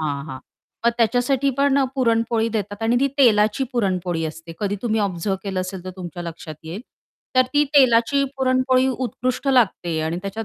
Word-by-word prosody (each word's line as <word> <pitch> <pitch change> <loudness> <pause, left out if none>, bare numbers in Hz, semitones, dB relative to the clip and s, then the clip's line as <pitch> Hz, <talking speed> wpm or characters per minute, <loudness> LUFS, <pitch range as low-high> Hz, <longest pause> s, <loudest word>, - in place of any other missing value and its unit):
हां. 145 -3 -3
हां. 130 -4 -7 0.5
मग - - +6
त्याच्यासाठी 245 +4 +2
पण 280 0 +3 0.2
पुरणपोळी 230 -2 +1
देतात 210 -1 -4
आणि 230 +2 +2
ती 275 - +3
तेलाची 215 -1 +4
पुरणपोळी 185 -7 -1
असते, 165 +1 -7
कधी 205 -1 -1
तुम्ही 220 -2 0
ऑब्झर्व्ह 195 -1 -1
केलं 195 -2 -2
असेल 185 0 -6
तर 185 - -5
तुमच्या 175 -1 -7
लक्षात 165 -2 -8
येईल. 170 +7 -6 0.6
तर 255 - +7
ती 295 0 +4
तेलाची 265 +1 +4
पुरणपोळी 255 0 +2
उत्कृष्ट 255 +1 -2
लागते 195 -10 +2
आणि 160 +2 -2
त्याच्यात 200 +3 -5
220 Hz, 165 wpm, -22 LUFS, 180-255 Hz, 0.6 s, तर